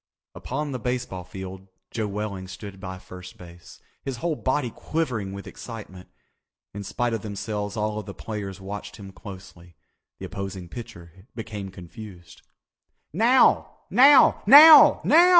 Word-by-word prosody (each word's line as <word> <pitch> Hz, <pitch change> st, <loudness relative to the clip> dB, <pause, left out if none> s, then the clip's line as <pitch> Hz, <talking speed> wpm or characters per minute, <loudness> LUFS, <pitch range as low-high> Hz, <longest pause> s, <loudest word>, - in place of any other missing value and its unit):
Upon 145 Hz, +3 st, -5 dB
the 130 Hz, -, -4 dB
baseball 125 Hz, -6 st, -4 dB
field 95 Hz, +1 st, -9 dB, 0.2 s
Joe 110 Hz, -2 st, -2 dB
Welling 100 Hz, -2 st, -5 dB
stood 95 Hz, +1 st, -10 dB
by 95 Hz, -1 st, -7 dB
first 90 Hz, 0 st, -12 dB
base, 85 Hz, -1 st, -14 dB, 0.2 s
his 135 Hz, -3 st, -5 dB
whole 165 Hz, +5 st, -2 dB
body 130 Hz, -3 st, -1 dB
quivering 125 Hz, -10 st, -3 dB
with 100 Hz, 0 st, -8 dB
excitement. 105 Hz, -6 st, -10 dB, 0.6 s
In 100 Hz, 0 st, -6 dB
spite 120 Hz, +4 st, -2 dB
of 110 Hz, -, -3 dB
themselves 105 Hz, 0 st, -5 dB
all 105 Hz, 0 st, -2 dB
the 100 Hz, -, -10 dB
players 100 Hz, -3 st, -6 dB
watched 105 Hz, +2 st, -8 dB
him 100 Hz, -2 st, -11 dB
closely. 95 Hz, -4 st, -13 dB, 0.4 s
The -, -, -8 dB
opposing 95 Hz, -2 st, -7 dB
pitcher 90 Hz, -3 st, -11 dB
became 105 Hz, -4 st, -7 dB
confused. 90 Hz, -1 st, -12 dB, 0.7 s
"Now! 235 Hz, +8 st, +3 dB, 0.2 s
Now! 275 Hz, +2 st, +6 dB
Now! 305 Hz, +2 st, +9 dB
Now!" 340 Hz, +4 st, +6 dB
100 Hz, 135 wpm, -24 LUFS, 95-120 Hz, 0.7 s, Now